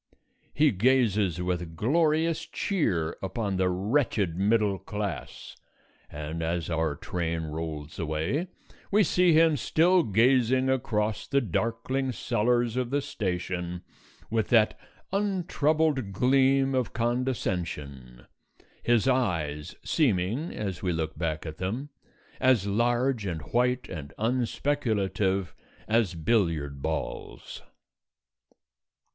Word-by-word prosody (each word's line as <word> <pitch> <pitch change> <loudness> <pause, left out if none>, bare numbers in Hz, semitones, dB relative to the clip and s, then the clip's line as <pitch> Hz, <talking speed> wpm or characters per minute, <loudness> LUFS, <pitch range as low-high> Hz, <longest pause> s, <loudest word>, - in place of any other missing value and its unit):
He 150 -1 +3
gazes 105 -5 +2
with 90 -2 -3
glorious 155 - +1
cheer 90 - -1
upon 95 0 -2
the 95 0 +2
wretched 100 - 0
middle 100 0 +2
class, 105 -8 -5 0.5
and 75 +2 -5
as 85 +1 -2
our 80 -2 0
train 85 +1 -3
rolls 80 0 -5
away 85 - -1 0.4
we 210 +1 +4
see 180 -2 +3
him 160 0 +5
still 175 +8 +3
gazing 130 - +3
across 110 -4 -1
the 140 - +2
darkling 115 +4 -1
cellars 120 +1 +1
of 125 -2 -1
the 140 +2 +1
station 90 -8 -3 0.5
with 110 -2 +1
that 110 -3 +4 0.4
untroubled 160 - +1
gleam 135 +4 +3
of 130 -2 -1
condescension, 90 - -3 0.6
his 120 0 +2
eyes 80 - 0
seeming 120 - +1
(as 95 -4 -4
we 90 - 0
look 80 -1 -2
back 80 -1 -3
at 80 -1 -7
them) 115 +10 -3 0.5
as 130 -6 +3
large 120 +2 +1
and 80 -4 -4
white 125 +1 +1
and 70 -4 -7
unspeculative 110 - 0 0.3
as 110 -5 +2
billiard 80 -7 0
balls. - - -5
110 Hz, 105 wpm, -27 LUFS, 85-130 Hz, 0.6 s, him